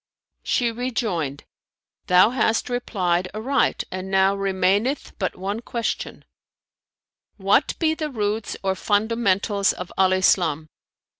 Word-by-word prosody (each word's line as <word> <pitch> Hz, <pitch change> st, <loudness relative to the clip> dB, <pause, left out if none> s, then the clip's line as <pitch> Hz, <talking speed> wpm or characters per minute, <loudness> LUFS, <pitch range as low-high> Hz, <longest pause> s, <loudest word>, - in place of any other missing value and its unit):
She 240 Hz, -2 st, 0 dB
rejoined, 220 Hz, -, -3 dB, 0.6 s
"Thou 180 Hz, +5 st, +6 dB
hast 225 Hz, -1 st, 0 dB
replied 185 Hz, -7 st, -1 dB
aright 250 Hz, +4 st, 0 dB
and 185 Hz, +1 st, -5 dB
now 195 Hz, 0 st, +3 dB
remaineth 195 Hz, +6 st, 0 dB
but 185 Hz, -, -2 dB
one 200 Hz, +4 st, -3 dB
question, 235 Hz, -1 st, -4 dB, 1.1 s
'What 200 Hz, +7 st, +2 dB
be 315 Hz, -2 st, +2 dB
the 310 Hz, -1 st, -4 dB
roots 215 Hz, -4 st, -2 dB
or 190 Hz, 0 st, +1 dB
fundamentals 205 Hz, -1 st, +1 dB
of 180 Hz, -, -8 dB
Al 190 Hz, -1 st, +4 dB
Islam?'" 175 Hz, -5 st, +2 dB
200 Hz, 115 wpm, -23 LUFS, 185-235 Hz, 1.1 s, Thou